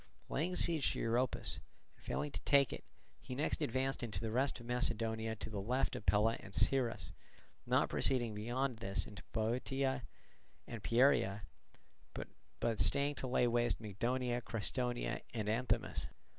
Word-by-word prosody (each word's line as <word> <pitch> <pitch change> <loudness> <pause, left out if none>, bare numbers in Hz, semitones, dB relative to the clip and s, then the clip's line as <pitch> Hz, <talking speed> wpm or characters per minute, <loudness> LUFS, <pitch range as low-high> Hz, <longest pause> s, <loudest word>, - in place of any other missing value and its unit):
Laying 175 +5 0
siege 165 -5 +4
to - - -4
Europus, 120 +2 0 0.4
and - - -24
failing 150 - -2
to - - -5
take 140 -2 +4
it, - - -7 0.4
he 125 - -7
next 150 +3 0
advanced 135 0 0
into 115 -4 -3
the 110 -1 -3
rest 130 +2 +1
of 120 - -11
Macedonia 115 -2 0
to - - -6
the 105 -2 -4
left 125 +6 0
of - - -7
Pella 110 +2 +4
and 100 -2 -9
Cyrrhus, 130 -4 +1 0.6
not - - +3
proceeding 120 -4 +1
beyond 120 +4 -1
this 100 -3 -1
into 100 -4 -9
Bottiaea 130 +4 0 0.6
and 115 -3 -7
Pieria, 110 -1 +3 1.2
but 115 -3 0
staying 140 - +3
to 130 - -4
lay 125 0 +3
waste 120 0 +2
Mygdonia, 120 +4 -1
Crestonia, 120 +2 -1
and 110 -2 -1
Anthemus. 115 +4 0
120 Hz, 150 wpm, -36 LUFS, 110-130 Hz, 1.2 s, siege